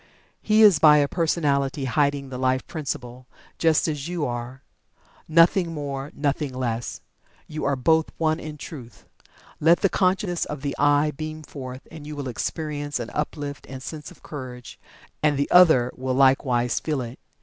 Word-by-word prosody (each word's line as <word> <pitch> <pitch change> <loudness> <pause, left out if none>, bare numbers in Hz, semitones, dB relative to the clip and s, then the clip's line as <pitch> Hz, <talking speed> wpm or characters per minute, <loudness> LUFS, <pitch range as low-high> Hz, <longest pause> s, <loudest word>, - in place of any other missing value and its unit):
He 215 0 +4
is 200 -8 +7
by 150 -1 +7
a 145 -1 +3
personality 145 -4 0
hiding 140 0 0
the 125 -1 -6
Life 130 0 +1
Principle, 125 -5 -6 0.3
just 160 -1 +3
as 150 -2 -3
you 175 -3 -2
are. 120 +2 -5 0.6
Nothing 165 +1 +4
more 140 -1 -5
nothing 145 -2 -1
less! 120 -2 -3 0.4
You 155 0 -5
are 140 0 +2
both 160 +5 +2
One 155 0 +1
in 150 -1 -7
Truth. 130 - -10 0.5
Let 165 +3 +4
the 195 - +3
conscious 185 -1 +1
of 150 -2 -7
the 140 - -2
"I" 145 +1 +3
beam 155 +1 -6
forth 130 -2 -9
and 155 -2 -10
you 150 - -6
will 140 -3 -4
experience 145 +3 -3
an 120 -1 -5
uplift 145 -1 -4
and 130 0 -8
sense 155 0 -7
of - - -18
Courage, 125 -4 -8 0.4
and 150 -2 +2
the 140 - -1
other 160 -9 +6
will 130 0 -2
likewise 130 -2 +3
feel 150 -4 -2
it. 120 +2 -8
145 Hz, 165 wpm, -24 LUFS, 130-155 Hz, 0.6 s, is